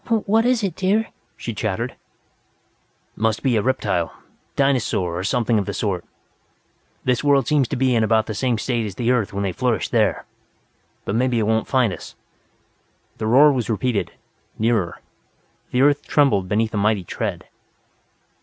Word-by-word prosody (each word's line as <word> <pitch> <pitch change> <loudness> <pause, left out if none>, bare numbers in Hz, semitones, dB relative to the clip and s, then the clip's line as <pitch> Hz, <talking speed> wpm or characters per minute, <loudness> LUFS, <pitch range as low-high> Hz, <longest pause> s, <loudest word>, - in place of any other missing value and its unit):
"What 225 +3 +3
is 250 -3 +2
it, 190 -5 -1
dear?" 205 +4 +1 0.3
she 115 - -5
chattered. 110 +3 -2 1.2
"Must 110 0 0
be 130 -3 +2
a 110 - +2
reptile. 100 -9 0 0.4
Dinosaur, 115 -10 +1
or - - -3
something 115 +1 +1
of 100 - -3
the 100 - -3
sort. 95 -5 -2 1.0
This 125 +1 +1
world 140 -4 +3
seems 145 -4 +2
to - - -3
be 130 0 +2
in 115 -2 +2
about 110 0 +2
the 110 - -4
same 120 +2 0
state 115 -1 -1
as 100 - -8
the 120 +3 0
Earth 115 -6 +1
when 100 0 -3
they 95 - -1
flourished 125 -2 -1
there.... - - +1 0.8
But - - -2
maybe 125 +1 +1
it 110 - +1
won't 110 +1 +1
find 125 -7 +2
us." - - -10 1.0
The 110 - -2
roar 140 +6 +6
was 125 -4 -2
repeated, 110 -3 -1 0.5
nearer. 110 -6 0 0.7
The 125 - +1
earth 145 0 +2
trembled 105 -11 +2
beneath 110 +2 0
a - - -1
mighty 105 -1 +1
tread. - - -4
115 Hz, 165 wpm, -21 LUFS, 105-130 Hz, 1.2 s, roar